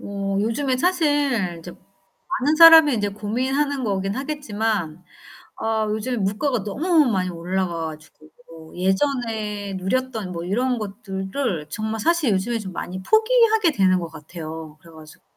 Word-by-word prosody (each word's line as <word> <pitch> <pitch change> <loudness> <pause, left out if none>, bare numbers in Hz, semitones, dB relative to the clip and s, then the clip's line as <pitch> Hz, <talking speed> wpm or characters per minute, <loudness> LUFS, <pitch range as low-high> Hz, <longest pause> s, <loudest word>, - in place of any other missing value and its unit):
어 195 -1 -3
요즘에 255 +5 0
사실 285 - +1
이제 170 +2 -10 0.5
많은 310 -4 -1
사람이 325 -3 +9
인제 205 -3 0
고민하는 260 +7 -1
거긴 195 -2 -1
하겠지만 220 - -3 0.5
아 220 -1 -1
요즘에 220 +4 -2
물가가 215 +4 -1
너무 310 - +2
많이 185 -3 0
올라가 170 -1 -3
가지고 155 0 -13 0.2
뭐 160 -1 -14
예전에 210 0 -1
누렸던 220 +1 -2
뭐 170 -1 -5
이런 245 +7 0
것들을 195 - -4
정말 220 +5 -4
사실 320 +1 +2
요즘에 205 +5 -1
좀 190 -4 -7
많이 185 +2 -6
포기하게 440 - +3
되는 190 -8 +2
것 170 - -5
같아요. 160 0 -9
그래 165 - -16
가지고 155 -1 -15
210 Hz, 310 characters per minute, -22 LUFS, 185-265 Hz, 0.5 s, 사람이